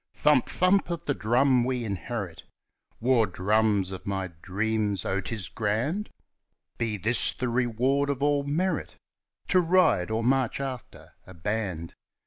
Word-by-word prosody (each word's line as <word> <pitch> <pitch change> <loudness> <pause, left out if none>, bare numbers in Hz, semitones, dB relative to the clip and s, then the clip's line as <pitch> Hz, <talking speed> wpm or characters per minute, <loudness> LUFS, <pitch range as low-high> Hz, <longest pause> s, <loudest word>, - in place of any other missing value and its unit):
Thump! 150 -4 +3
thump! 185 +2 +2
of 170 -1 -4
the 145 - 0
drums 125 +2 +2
we 125 -1 -2
inherit 100 -2 -5 0.6
War 120 -2 +3
drums 100 +1 +1
of 95 - -8
my 95 -2 -2
dreams 105 0 -1
oh, 95 +1 0
it's 105 -3 -3
grand! 120 - -2 0.7
Be 110 -2 -1
this 115 +6 +4
the 125 - -3
reward 130 +4 +1
of 140 -1 -2
all 145 0 +2
merit 165 +7 -2 0.5
To 185 - +5
ride 165 - +3
or 110 +1 -1
march 130 0 +1
after 130 -3 -7 0.2
a 95 - -12
band 90 -2 -3
115 Hz, 140 wpm, -27 LUFS, 100-140 Hz, 0.7 s, To